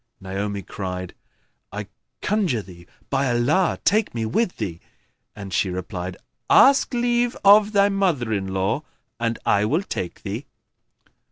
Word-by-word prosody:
Naomi 100 +1 -4
cried, 90 -1 -5 0.6
"I 105 +2 -5 0.4
conjure 185 - +1
thee 85 -2 -14 0.2
by 135 -1 +1
Allah 140 +10 +2
take 210 - +2
me 115 -1 -1
with 180 - 0
thee!"; 90 -7 -4 0.6
and 100 -3 -8
she 95 - +1
replied, 90 0 -5 0.3
"Ask 275 -1 +5
leave 240 0 +1
of 205 +1 +7
thy 200 -1 +4
mother 175 - 0
in 95 -2 -1
law, 95 +7 -1 0.4
and 115 -1 -1
I 100 +1 +3
will 155 - +1
take 90 - -5
thee." 110 +7 -5
115 Hz, 140 wpm, -23 LUFS, -, 0.6 s, of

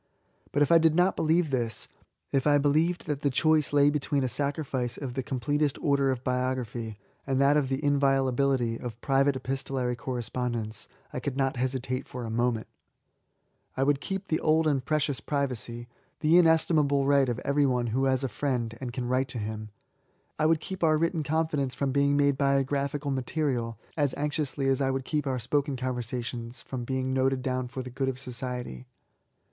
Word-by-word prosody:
But 145 - +3
if 145 - +1
I 165 - +8
did 160 -1 +3
not 180 +2 +3
believe 160 0 +2
this, 120 -4 -1 0.2
— - - -43
^if 135 +1 +2
I 145 -1 +5
believed 155 +5 +2
tbat 150 -3 -2
the 145 - +1
choice 155 +2 +2
lay 145 0 +5
between 145 -1 0
a - - +1
sacrifice 135 -3 -2
of 135 -4 -5
the 130 - -1
completest 140 +3 -1
order 140 -2 +2
of 130 -1 -2
biography 125 -4 -2 0.3
and 135 -1 +1
that 140 +1 +5
of 145 -3 +2
the 135 +2 -2
inviolability 135 -3 +2
of 120 -2 -7
private 135 0 +2
epistolary 130 -1 -2
correspond 125 0 -3
ence, 110 -1 -5 0.3
I - - -2
could 135 -2 -4
not 135 -1 +1
hesitate 130 0 -2
for 125 -1 -6
a 110 - -5
moment 120 -1 0 1.1
I 135 - +2
would 140 0 +2
k^cip 195 0 -4
the 160 - +1
old 160 +1 +3
and 140 -4 +1
precious 150 -2 0
privacy, 125 -4 -3 0.2
— - - -42
^the 155 - +2
inestim^ 165 -1 +5
94 - - +6
B88AY8. - - +4
able 140 -1 +1
right 140 -2 +4
of 120 - -2
every 140 0 +3
one 125 -2 +1
who 135 +2 +2
has 130 0 +1
a - - +1
friend 120 -2 -2
and 125 -2 -4
can 125 0 -3
write 130 +1 +1
to 125 - -5
him; 110 0 -4 0.4
— - - -40
I 155 - +4
would 160 -1 +3
keep 190 +1 -5
our 155 -1 +4
written 165 +1 0
confi 160 +2 0
dence 135 -2 -1
from 140 -1 -1
being 140 +1 +3
made 140 -1 +2
biographical 140 +1 +1
material^ 130 -3 -1 0.2
as 145 -4 +1
anxiously 145 -2 -1
as 135 0 +2
I 135 - +2
would 135 -1 -2
keep 150 -1 -1
our 130 -1 0
spoken 140 +4 0
conversa 125 -1 -3
tion 120 -1 -5
from 125 0 -7
being 130 0 -1
noted 130 0 +1
down 130 -1 -1
for 130 +1 -6
the 125 - -8
good 135 +1 -1
of 130 - -4
society. 125 - -6
135 Hz, 205 wpm, -28 LUFS, 125-145 Hz, 1.1 s, I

